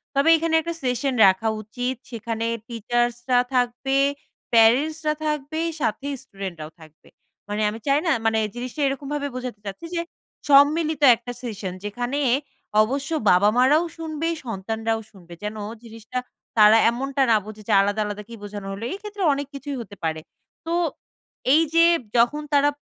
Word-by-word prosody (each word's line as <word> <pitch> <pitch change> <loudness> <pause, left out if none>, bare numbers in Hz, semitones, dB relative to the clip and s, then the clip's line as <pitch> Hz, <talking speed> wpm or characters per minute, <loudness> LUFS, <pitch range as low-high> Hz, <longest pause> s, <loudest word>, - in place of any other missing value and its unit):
তবে 280 +4 +4
এখানে 330 0 -1
১ 320 - -6
টা - - -1
সেশন 255 +2 0
রাখা 190 +4 +2
উচিত 245 +4 -3 0.2
সেখানে 230 -1 -3 0.2
টিচার্সরা 240 +2 0 0.2
থাকবে, 250 +2 +1 0.6
প্যারেন্টসরা 300 +8 +4
থাকবে, 300 +1 -2 0.2
সাথে 240 +4 -1 0.2
স্টুডেন্টরাও 175 -6 -7
থাকবে 155 -1 -17 0.4
মানে 210 +1 -2
আমি 220 +2 -6
চাই 280 +2 +4
না - - +4
মানে 225 0 +3 0.2
জিনিসটা 250 +4 -5
এরকমভাবে 285 +1 -3
বোঝাতে 250 -4 -5
চাচ্ছি 200 +11 -7
যে 335 - 0 0.5
সম্মিলিত 300 +2 +5
একটা 240 +2 -8
সেশন 205 -6 -5
যেখানে 245 +6 -2 0.6
অবশ্য 270 +5 -3 0.2
বাবা 195 +4 +5
মারাও 280 +6 +5
শুনবে, 320 -1 -3 0.2
সন্তানরাও 225 +1 -2
শুনবে। 175 -4 -14
যেন 210 +1 -4 0.3
জিনিসটা 225 +2 -6 0.4
তারা 215 +1 +8
এমনটা 270 +3 -2
না - - +6
বোঝে 215 0 -10
যে 220 - +2
আলাদা 205 +2 0
আলাদা 210 0 -5
কি - - -9
বোঝানো 205 -1 -7
হলো? 200 +3 -7
এই - - -4
ক্ষেত্রে 415 -1 -5
অনেক 280 0 -4
কিছুই 275 0 -5
হতে 205 -3 -10
পারে। 160 -1 -1 0.4
তো 330 - -2 0.8
এই 315 - +6
যে 335 0 +6 0.3
যখন 245 +6 +3
তারা 285 0 +5
240 Hz, 150 wpm, -23 LUFS, 215-285 Hz, 0.8 s, তারা